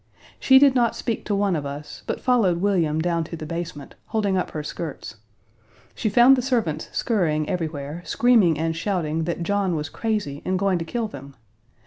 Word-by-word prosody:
She 265 - +6
did 275 -1 +6
not 240 -3 +2
speak 230 -3 -3
to 205 - 0
one 200 -2 +1
of 150 - -2
us, 145 +1 -7
but - - -2
followed 225 -9 +2
William 175 -6 +1
down 170 -1 0
to 170 - -7
the 155 - -7
basement, 165 -3 -6
holding 210 -3 0
up 180 - -1
her 150 - -5
skirts. 150 -7 -6 0.8
She 220 - -1
found 240 +5 +6
the 255 - -1
servants 225 - -1
scurrying 155 -9 0
everywhere, 155 -2 -4
screaming 225 - +3
and 160 +1 -1
shouting 165 -3 -1
that 170 0 -3
John 195 -1 0
was 150 -1 -3
crazy 210 -11 -3
and 185 0 0
going 190 -2 +1
to 165 - -4
kill 225 +7 -2
them. 140 -6 -11
175 Hz, 185 wpm, -23 LUFS, 155-215 Hz, 0.8 s, She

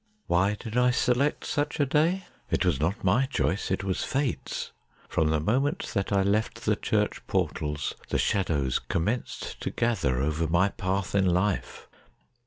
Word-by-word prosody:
Why 95 +4 +2
did 115 +1 -5
I 125 0 +5
select 125 +3 +1
such 145 +1 -1
a 145 - +4
day? 160 +7 +2 0.3
It - - +1
was 85 -7 +2
not 90 +9 -1
my 110 +8 +3
choice, 105 -6 -1
it 95 0 -1
was 95 -2 -1
Fate's. 135 -2 -2 0.4
From 80 -1 +1
the 80 0 +2
moment 130 - 0
that 100 -3 -1
I 100 -1 +3
left 105 +3 0
the - - +3
church - - 0
portals, 75 -1 -1 0.2
the - - +1
shadows 75 -10 +1
commenced 105 +9 -3
to - - -2
gather 90 - 0
over 75 +4 0
my 85 +5 +3
path 95 0 -2
in 100 -1 +3
life. 90 +2 0
100 Hz, 165 wpm, -27 LUFS, 85-125 Hz, 0.4 s, I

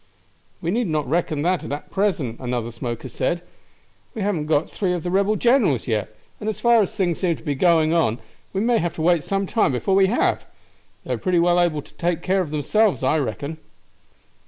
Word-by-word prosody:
"We 170 -1 -1
need 230 +2 0
not 155 -4 -1
reckon 155 -1 0
that 180 +1 +1
out - - -6
at 145 +1 -6
present," 175 - -1
another 120 -2 -3
smoker 120 +1 -5
said. 170 +8 -2 0.7
"We 215 - -2
haven't 175 -7 -1
got 155 0 +2
three 185 -3 -1
of 175 -3 -3
the 175 - -2
rebel 200 +3 +2
generals 220 - +2
yet, 110 -2 -2 0.2
and 215 - -3
as 215 -1 -4
far 235 0 +5
as 210 +2 -2
things 180 -5 0
seem 175 -3 +1
to - - -15
be 145 -3 -1
going 160 +1 +3
on, 140 -10 +2 0.3
we 195 - -1
may 230 0 +2
have 170 0 -2
to 160 - -3
wait 170 -2 +3
some 195 0 -1
time 220 -2 +1
before 160 +10 0
we 195 0 +5
have. 230 +6 +1 0.6
They - - -3
are - - -3
pretty 185 -4 +1
well 175 +1 +4
able 155 -4 0
to - - -19
take 170 0 -2
care 190 +1 +2
of 170 - -4
themselves, 175 +6 +1
I 155 +4 +2
reckon." 140 +5 -4
175 Hz, 215 wpm, -22 LUFS, 150-195 Hz, 0.7 s, far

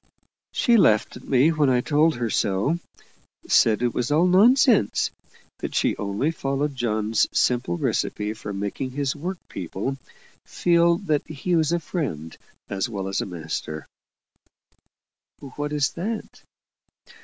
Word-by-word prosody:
She 235 -2 +3
laughed 110 - +3
at 125 - -12
me 135 +4 +4
when 150 -4 +2
I 125 -1 +3
told 155 +4 +2
her 120 -2 -2
so 105 - 0 0.7
said 110 +1 +4
it 120 - +1
was 125 +2 -1
all 160 +4 +4
nonsense 215 - +4 0.5
that - - -5
she - - +2
only 105 +9 -1
followed 140 -1 -2
John's 110 -3 +1
simple 120 -9 +1
recipe 105 +4 -1
for 110 -1 -7
making 100 +6 -3
his 135 0 -2
work 180 +5 -4
people 95 +10 -4 0.5
feel 170 -1 +2
that 150 -4 0
he 160 +4 -2
was 160 -1 +2
a 170 - +1
friend 105 - -4 0.3
as 95 +1 -2
well 100 -4 -4
as 95 - -1
a - - -4
master. 80 -3 -5 1.7
"What 145 0 -3
is 145 -2 +1
that?" 215 +6 -5
135 Hz, 140 wpm, -24 LUFS, 105-160 Hz, 1.7 s, me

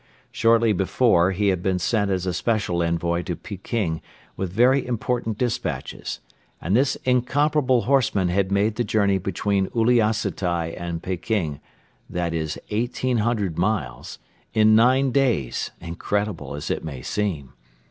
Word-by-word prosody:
Shortly 115 -1 +3
before 95 -1 +3
he 100 +2 +1
had 90 -2 0
been 95 0 0
sent 100 +3 0
as 95 -2 -1
a 90 - -1
special 90 -2 0
envoy 85 +1 0
to 90 0 -4
Peking 100 -4 -3 0.3
with 95 -2 -3
very 125 +6 +4
important 120 -2 -2
despatches 120 -1 -3 0.4
and 90 +5 0
this 130 +3 +3
incomparable 130 +1 +2
horseman 120 -9 +2
had 95 +2 0
made 105 +2 +1
the 120 - +1
journey 100 -4 +2
between 95 +1 -1
Uliassutai 105 -7 +1
and 85 -1 -5
Peking, 90 -4 -2 0.5
that 85 -1 -2
is 80 -2 -2
1,800 115 -5 0
miles, 90 - -2 0.4
in 110 0 +5
nine 130 +4 +4
days, 120 - 0
incredible 85 -3 -3
as 75 - -4
it - - -2
may 70 -6 -6
seem. 80 -11 -2
100 Hz, 135 wpm, -23 LUFS, 85-115 Hz, 0.5 s, in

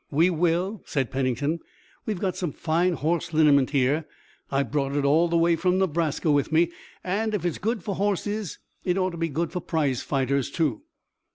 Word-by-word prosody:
"We 165 +5 +3
will," 175 +4 0
said 135 -4 -1
Pennington; 135 +4 0 0.5
"we've 215 -3 -1
got 185 -2 -1
some 175 -5 -2
fine 170 +4 +1
horse 170 +2 -1
liniment 145 -4 +5
here. 145 +3 +1 0.4
I 140 0 +1
brought 140 +2 -2
it 145 -1 +1
all 160 +5 +4
the 170 0 +1
way 170 0 +4
from 180 +2 +1
Nebraska 165 -3 +1
with 145 +1 +1
me, 165 +2 +3 0.3
and 215 +4 -1
if 180 -4 -3
it's 175 - -1
good 225 +3 -1
for 200 - -2
horses 205 0 -2 0.3
it 180 0 0
ought 185 -1 +1
to 170 - -7
be 165 0 -1
good 160 +3 -2
for 180 - -2
prize 150 -8 0
fighters, 135 -1 0
too. 165 - -1
165 Hz, 190 wpm, -25 LUFS, 145-180 Hz, 0.5 s, liniment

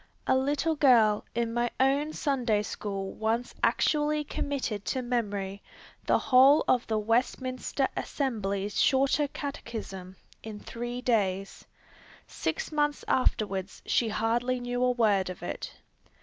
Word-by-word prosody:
A - - +3
little 290 +4 +1
girl 235 -8 +4
in 235 -1 -1
my 240 0 +1
own 280 +3 +2
Sunday 245 -9 0
School 195 -2 -4
once 225 +3 -2
actually 300 0 +2
committed 265 -8 -3
to 260 -1 -1
memory 205 -5 -2 0.5
the - - +4
whole 270 +3 +6
of 245 -1 +2
the 220 - 0
Westminster 255 +4 0
Assembly's 205 -7 -2
Shorter 275 +2 +3
Catechism 220 -10 -7 0.3
in 215 -2 -8
three 240 +3 -5
days! 195 -6 -1 0.6
Six 485 - -3
months 295 -1 0
afterwards 195 -6 0
she 230 - +1
hardly 240 +4 0
knew 245 0 -2
a 250 - +4
word 210 -6 +2
of 185 - -8
it. - - -5
240 Hz, 125 wpm, -28 LUFS, 210-265 Hz, 0.6 s, whole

